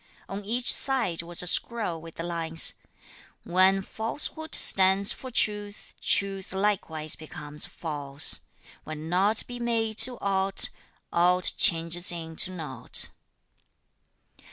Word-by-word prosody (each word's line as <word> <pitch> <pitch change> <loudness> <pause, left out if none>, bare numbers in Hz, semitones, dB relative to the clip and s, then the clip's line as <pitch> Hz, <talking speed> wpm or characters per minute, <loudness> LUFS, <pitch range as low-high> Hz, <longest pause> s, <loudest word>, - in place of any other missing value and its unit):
On 200 +1 -7
each 240 +4 +2
side 240 -12 -1
was 170 +1 0
a - - -7
scroll 180 -3 0
with 165 0 -13
the 165 - -6
lines: 165 -1 0 0.7
When 190 +2 +2
falsehood 295 +10 -3
stands 190 +1 +5
for 260 - -10
truth, 210 -3 -2
truth 195 -1 0
likewise 190 -6 -2
becomes 150 0 -5
false, 145 -5 -1 0.4
Where 155 - -8
naught 180 +8 0
be 245 0 -8
made 225 -2 -2
to 245 +2 +5
aught, 195 0 +1 0.4
aught 180 +1 +3
changes 170 +1 +1
into 165 0 +1
naught. 150 -9 +1
185 Hz, 115 wpm, -26 LUFS, 165-210 Hz, 0.7 s, stands